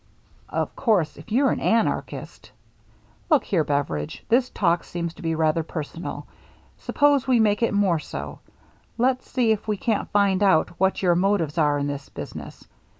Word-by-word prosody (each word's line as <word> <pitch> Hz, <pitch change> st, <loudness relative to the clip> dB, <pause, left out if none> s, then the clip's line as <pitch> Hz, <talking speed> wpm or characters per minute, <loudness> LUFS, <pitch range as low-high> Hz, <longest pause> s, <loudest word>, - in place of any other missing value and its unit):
" -, -, -31 dB
Of -, -, -10 dB
course, 195 Hz, -, +1 dB
if 225 Hz, -, -14 dB
you're 265 Hz, +3 st, +3 dB
an -, -, -1 dB
anarchist 225 Hz, 0 st, -1 dB, 0.2 s
— -, -, -36 dB
" -, -, -34 dB
" -, -, -34 dB
Look 305 Hz, -4 st, +4 dB
here, 170 Hz, -6 st, +1 dB
Beveridge, 140 Hz, -, -3 dB
this 250 Hz, +2 st, +3 dB
talk 170 Hz, -3 st, +1 dB
seems 170 Hz, -1 st, -4 dB
to -, -, -14 dB
be 165 Hz, -1 st, -1 dB
rather 160 Hz, 0 st, +1 dB
personal 160 Hz, +1 st, -6 dB, 0.3 s
— -, -, -30 dB, 0.2 s
suppose 285 Hz, -3 st, +2 dB
we 250 Hz, -3 st, +4 dB
make 210 Hz, -1 st, +2 dB
it 230 Hz, -, +2 dB
more 195 Hz, -5 st, +2 dB
so. -, -, -7 dB, 0.6 s
Let's 255 Hz, +2 st, 0 dB
see 245 Hz, -3 st, +2 dB
if 220 Hz, 0 st, -1 dB
we 210 Hz, -1 st, 0 dB
can't 220 Hz, +1 st, -1 dB
find 200 Hz, -2 st, +2 dB
out 190 Hz, -5 st, +3 dB
what 190 Hz, +1 st, +1 dB
your 175 Hz, -2 st, +4 dB
motives 175 Hz, -4 st, +1 dB
are 145 Hz, -2 st, +3 dB
in 140 Hz, -, -1 dB
this 140 Hz, -1 st, -5 dB
business. -, -, -9 dB
190 Hz, 190 wpm, -24 LUFS, 160-225 Hz, 0.6 s, Look